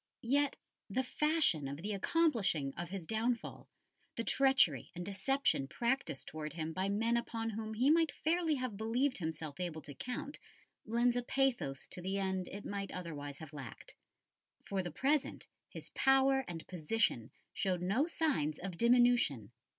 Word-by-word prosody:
Yet 280 +4 +2 0.3
the 260 - 0
fashion 300 - +2
of 140 +1 -5
the 210 +1 -2
accomplishing 195 - +1
of 175 0 -5
his 190 -3 -5
downfall, 225 +4 -2 0.5
the 230 - -1
treachery 265 - +3
and 175 0 -5
deception 200 - +1
practised 235 - -1
towards 155 0 -5
him 160 -1 -3
by 190 +2 -1
men 225 +4 +2
upon 225 -1 -2
whom 220 0 -4
he 255 +6 +4
might 325 -1 +4
fairly 325 0 +1
have 255 -6 -3
believed 245 +5 +1
himself 160 -2 -4
able 170 -3 -4
to 145 - -9
count, 250 - -5 0.5
lend 235 +2 +3
a 245 - +1
pathos 245 - 0
to 180 - -6
the 190 +2 -2
end 190 -2 -1
it 200 - -7
might 200 -1 -4
otherwise 145 -5 -6
have 160 -1 -10
lacked. 135 -6 -9 0.7
For 195 -1 -1
the 175 - -4
present 275 - 0 0.2
his - - -9
power 270 0 +4
and 165 -2 -6
position 170 - 0 0.2
showed 180 -2 0
no 225 - +2
signs 270 - 0
of 180 -2 -6
diminution. 235 - +4
205 Hz, 160 wpm, -35 LUFS, 165-260 Hz, 0.7 s, he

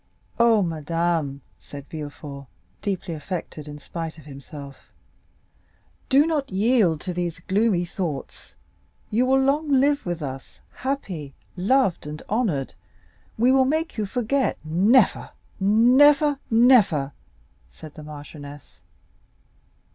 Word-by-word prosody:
"Oh, 230 -3 +5
madame," 165 -3 -1 0.2
said 140 -1 -10
Villefort, 145 -2 -8 0.3
deeply 190 -3 -3
affected, 155 -1 -6
in 145 0 -8
spite 165 +2 -6
of 155 - -14
himself, 140 0 -11 1.2
"do 275 +3 +5
not 300 -4 -1
yield 195 -5 +2
to 180 - -4
those 175 -1 -3
gloomy 190 +1 +1
thoughts; 170 -6 -6 0.6
you 240 +4 +2
will 265 +1 +4
long 285 +3 +1
live 280 +2 +3
with 175 -3 -4
us, 135 -1 -7
happy, 185 - -4 0.2
loved, 195 - +1
and 150 +1 -7
honored, 200 - 0
and - - -24 0.7
we 250 - +6
will 265 0 +4
make 315 +4 -1
you 215 -3 -2
forget——" 250 +5 0
"Never, 195 +9 +3 0.3
never, 270 +8 +5
never," 225 - +4 0.6
said 140 - -12
the 155 - -11
marchioness. 145 -1 -11
180 Hz, 115 wpm, -24 LUFS, 150-250 Hz, 1.2 s, we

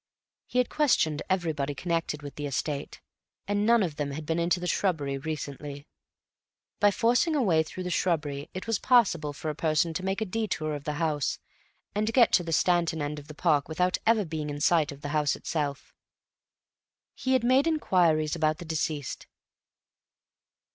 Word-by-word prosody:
He - - -4
had 250 - +3
questioned 235 - +2
everybody 155 -6 -1
connected 165 -2 -2
with 145 - -7
the 145 -1 -4
estate, 140 +1 -3 0.5
and 205 +1 +1
none 235 -2 +5
of 160 -5 -3
them 145 -1 -2
had 155 +2 -6
been 160 +2 -1
into 175 +1 +1
the 180 - -5
shrubbery 155 -7 0
recently. 145 -1 -6 0.9
By 205 - +6
forcing 240 - +2
a 290 - +2
way 165 -7 +3
through 185 +3 -6
the 180 - -3
shrubbery 150 -6 -1
it 185 - -5
was 225 -3 0
possible 190 - +3
for 155 +2 -4
a - - -8
person 160 +2 +1
to 175 - -3
make 195 +1 -1
a 220 - -1
detour 185 -7 -2
of 145 -1 -6
the 150 - -1
house 150 -2 -1 0.6
and 215 +2 0
get 240 -1 +5
to 175 - +4
the 165 - -5
Stanton 170 -1 +2
end 150 0 -3
of 145 - -14
the 150 - -10
park 150 -4 +2
without 180 +3 +1
ever 220 -3 +4
being 155 -2 -4
in 145 0 -4
sight 155 0 +3
of 140 0 -11
the 145 - -5
house 150 -1 +1
itself. 145 -4 -4 1.2
He 260 - -1
had 255 - +3
made 260 +5 +4
inquiries 170 - +2
about 155 -2 +1
the 175 - -9
deceased. 155 -4 -3
160 Hz, 180 wpm, -28 LUFS, 150-190 Hz, 1.2 s, By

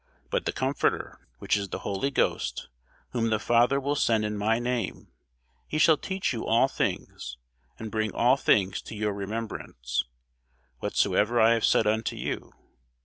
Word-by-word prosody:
But - - 0
the - - +1
Comforter, 135 +2 -1 0.2
which - - +1
is 100 -1 -2
the - - -3
Holy 100 +7 -1
Ghost, - - -1 0.4
whom 115 -2 0
the 110 - +2
Father 120 +5 +3
will 140 +1 -1
send 110 -6 +2
in 105 0 -2
my 110 +2 +1
name, 120 0 -3 0.6
he 155 - -2
shall 155 +1 +6
teach 190 0 -2
you 115 - -3
all 115 +4 +4
things, 65 - -3 0.4
and 110 -1 -7
bring 110 -1 -1
all 125 +6 +4
things 95 -8 +2
to - - -7
your 105 -1 -1
remembrance, 100 - -3 0.8
whatsoever 115 +3 +1
I 115 +1 +6
have 115 - +2
said 110 - +3
unto 110 +1 0
you. - - -4
110 Hz, 160 wpm, -27 LUFS, 105-125 Hz, 0.8 s, shall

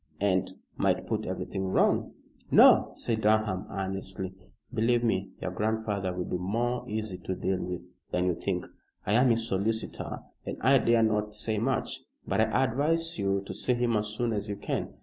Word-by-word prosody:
"And 95 -2 +2 0.3
might - - +1
put - - -2
everything 95 0 -3
wrong." 95 - +2 0.4
"No," - - +7
said 110 -2 -1
Durham, 105 -3 +2
earnestly, 95 -1 -4 0.4
"believe 120 +2 +2
me, 95 -4 0
your 95 - -3
grandfather 105 -1 -1
will 90 0 -3
be 90 - -2
more 120 +7 -1
easy 105 -3 -3
to 95 +1 -4
deal 95 0 -1
with 90 -1 -5 0.2
than 90 0 0
you 90 - +2
think. 90 +1 -2 0.4
I 105 - +1
am 125 +3 +5
his 115 -1 +2
solicitor 110 +3 -2 0.2
and - - -5
I 135 +2 +5
dare 115 -1 +3
not 105 -1 0
say 110 0 0
much, 130 +4 -1 0.3
but - - +1
I 110 +4 +2
advise 155 +5 +1
you 100 0 +1
to - - -6
see 125 - 0
him 120 -1 +1
as 105 0 +1
soon 115 +2 -1
as 105 0 -3
you 100 - -2
can. 100 - -3
105 Hz, 180 wpm, -29 LUFS, 95-115 Hz, 0.4 s, No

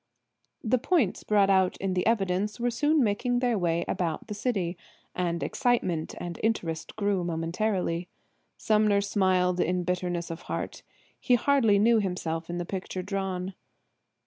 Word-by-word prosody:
The 240 +2 +2
points 280 - +1
brought 200 -2 +3
out 190 -1 +3
in 195 -1 -2
the 180 +2 0
evidence 205 -1 0
were 245 0 +1
soon 295 +4 +2
making 240 +4 +1
their 245 -1 +1
way 170 -3 0
about 165 -3 -2
the 210 - -6
city, 200 -5 -1 0.4
and 170 -2 -1
excitement 185 -11 0
and 175 -1 -6
interest 170 -8 -2
grew 200 -4 0
momentarily. 175 +1 -1 0.5
Sumner 210 -2 +3
smiled 185 -3 +2
in 180 +1 +1
bitterness 175 -1 -2
of 165 +1 -6
heart. - - -4 0.4
He 250 - +3
hardly 240 -4 +3
knew 225 +2 +4
himself 170 -4 -3
in 175 - -3
the 175 - -3
picture 185 0 -4
drawn. 190 -1 -3
190 Hz, 145 wpm, -28 LUFS, 175-220 Hz, 0.5 s, knew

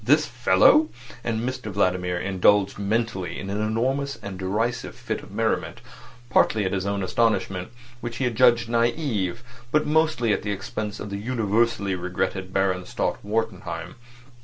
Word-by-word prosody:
This 150 +7 +4
fellow! 125 +5 +4 0.3
And 115 +1 -1
Mr 130 -2 -4
Vladimir 90 -2 +1
indulged 100 +2 +2
mentally 100 -4 -1
in 100 - -5
an 105 +1 -1
enormous 130 +6 0
and 95 -2 -8
derisive 105 +6 -1
fit - - -4
of - - -13
merriment, - - -1 0.5
partly 110 -3 +3
at 95 - -1
his 95 0 -1
own 100 -1 -1
astonishment, 95 -3 0 0.3
which 120 -1 -5
he 135 - +1
judged 120 0 +4
naive, 115 - 0 0.3
but 150 0 +3
mostly 150 -7 +2
at - - -1
the 105 - -4
expense 105 +1 -4
of 105 - -6
the 100 - -2
universally 115 -2 +1
regretted 95 +1 -2
Baron 95 -1 0
Stott - - -1
Wartenheim. 105 -6 -3
105 Hz, 150 wpm, -25 LUFS, 95-120 Hz, 0.5 s, This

